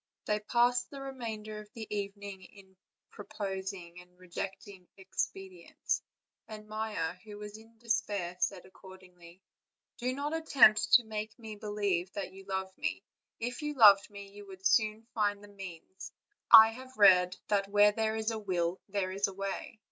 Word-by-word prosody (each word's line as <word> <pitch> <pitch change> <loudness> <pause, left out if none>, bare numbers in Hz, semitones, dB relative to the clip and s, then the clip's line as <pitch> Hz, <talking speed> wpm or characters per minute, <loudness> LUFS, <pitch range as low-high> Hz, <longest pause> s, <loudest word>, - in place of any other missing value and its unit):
They 210 0 0
passed 245 +3 +2
the 280 - -9
remainder 225 -6 -6
of 210 0 -12
the 225 -1 -6
evening 200 -1 -6
in 190 0 -17 0.4
proposing 190 -4 -6
and 180 0 -22
re 185 0 -17
jecting 190 0 -6
expedients; 190 -2 -4 0.5
and 215 -1 -10
Maia, 215 -6 -3
who 210 -1 -10
was 210 0 -8
in 225 +1 -15
despair, 205 -6 -2
said 185 -1 -1
accordingly: 185 -2 -16 0.6
"Do 250 +1 -1
not 290 +2 -3
attempt 260 -9 +4
to 245 - +8
make 215 0 -6
me 220 -3 -8
believe 205 -4 -2
that 195 -2 -5
you 195 0 -13
love 190 -1 -4
me; - - -3 0.4
if 245 +4 -4
you 295 0 -3
loved 205 -5 +7
me, 200 -1 -10
you 205 0 -12
would 190 0 -12
soon 215 +1 +2
find 205 -2 0
the 205 - -13
means. 190 -2 -10 0.4
I 220 -1 +11
have 260 +3 -11
read 180 -3 +6
that 200 -1 +1
where 205 0 +5
there 220 +1 -1
is 220 +1 -1
a 220 - -4
will 180 -3 -2
there 195 -2 -2
is 200 +1 0
a 195 - -7
way." 195 +3 -5
205 Hz, 165 wpm, -31 LUFS, 190-220 Hz, 0.6 s, I